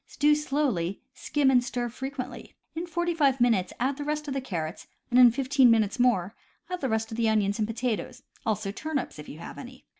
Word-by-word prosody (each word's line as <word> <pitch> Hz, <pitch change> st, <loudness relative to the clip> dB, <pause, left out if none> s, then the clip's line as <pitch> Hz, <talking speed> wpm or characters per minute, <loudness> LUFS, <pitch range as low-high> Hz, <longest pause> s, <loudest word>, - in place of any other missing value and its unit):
Stew 295 Hz, +1 st, +3 dB
slowly, 270 Hz, -, 0 dB
skim 285 Hz, -3 st, +1 dB
and 250 Hz, -2 st, +4 dB
stir 245 Hz, -1 st, -2 dB
frequently. 255 Hz, +1 st, -7 dB, 0.2 s
In 335 Hz, +2 st, -4 dB
forty 345 Hz, +1 st, -1 dB
five 280 Hz, -5 st, +2 dB
minutes 230 Hz, -7 st, +2 dB
add 265 Hz, +3 st, 0 dB
the 290 Hz, -, -4 dB
rest 300 Hz, +1 st, -2 dB
of 275 Hz, -, -2 dB
the 270 Hz, -, -2 dB
carrots, 170 Hz, -9 st, -5 dB, 0.2 s
and 245 Hz, -, +5 dB
in 250 Hz, -1 st, +9 dB
fifteen 260 Hz, +1 st, +3 dB
minutes 220 Hz, -1 st, +2 dB
more 210 Hz, -6 st, +2 dB, 0.4 s
add 360 Hz, -, -3 dB
the 265 Hz, -, 0 dB
rest 220 Hz, +1 st, -1 dB
of 220 Hz, -, -5 dB
the 230 Hz, -1 st, +2 dB
onions 205 Hz, -1 st, +1 dB
and 215 Hz, -, +1 dB
potatoes, 235 Hz, 0 st, -3 dB, 0.2 s
also 215 Hz, -2 st, -1 dB
turnips, 285 Hz, -, -4 dB
if 150 Hz, -, -9 dB
you 150 Hz, -, -9 dB
have 170 Hz, -, -9 dB
any. 255 Hz, 0 st, -11 dB
250 Hz, 210 wpm, -27 LUFS, 220-280 Hz, 0.4 s, in